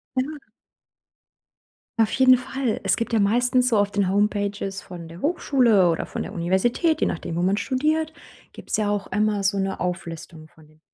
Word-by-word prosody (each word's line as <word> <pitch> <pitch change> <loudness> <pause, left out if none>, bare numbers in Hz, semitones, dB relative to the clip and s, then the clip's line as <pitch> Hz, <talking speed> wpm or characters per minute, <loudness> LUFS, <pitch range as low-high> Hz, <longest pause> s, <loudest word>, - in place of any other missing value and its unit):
Ja. 285 +4 -2 1.6
Auf 220 -1 +3
jeden 260 -1 +6
Fall. 260 -1 -3
Es - - +2
gibt 230 0 -3
ja 220 - +3
meistens 245 +4 +2
so 225 - +2
auf 205 0 +1
den 200 -2 +1
Homepages 200 -1 -1
von 175 -3 -10
der 170 +3 -11
Hochschule 250 - +3
oder 165 - -2
von - - -5
der - - -7
Universität, 190 - +1
je - - +2
nachdem, 165 0 -4
wo 175 - 0
man 190 +2 +2
studiert 310 +6 0 0.4
gibt's - - -3
ja 215 -1 0
auch 205 -1 -2
immer 210 0 +1
so 200 +1 +1
'ne 195 0 -2
Auflistung 165 -3 -5
von 155 -1 -21
den... 155 +1 -25
205 Hz, 180 wpm, -23 LUFS, 185-250 Hz, 1.6 s, jeden